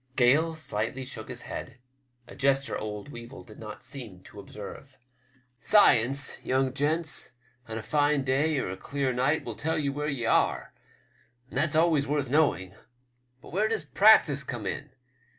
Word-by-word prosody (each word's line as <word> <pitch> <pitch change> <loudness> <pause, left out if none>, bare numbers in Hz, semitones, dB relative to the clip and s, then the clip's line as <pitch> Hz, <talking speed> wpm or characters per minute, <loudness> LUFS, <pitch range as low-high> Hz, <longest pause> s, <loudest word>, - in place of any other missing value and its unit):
Gale 145 +6 +4
filigbtly 130 -3 -3
shook 110 -2 -7
his 125 -1 -7
head, 125 -2 -7 0.5
a - - -11
gesture 135 0 +1
old 105 +3 -5
Weevil 120 0 -10
did 105 - -14
not 105 -1 -9
seem 110 -11 -10
to 105 - -13
observe. 105 +7 -10 0.6
"Science, 140 - +3
young 130 0 0
gents, 150 0 -1 0.3
on 110 0 -5
a 110 - -5
fine 145 +5 +2
day 140 +4 +2
or 110 - -2
a 95 - -6
clear 140 -2 -2
night, 135 +6 +1
will 120 - -4
tell 160 +9 -1
ye 145 -2 0
where 145 +2 -3
ye 130 -5 -3
are, - - +1 0.8
and - - -6
that's 155 0 +1
always 160 -3 +3
worth 145 -2 -1
knowing. 130 -11 +2 0.7
But - - -12
where 210 +4 +2
does 220 -6 -1
practice 150 -5 +5
come 120 -5 -5
in 145 +9 -3
135 Hz, 165 wpm, -28 LUFS, 120-150 Hz, 0.8 s, practice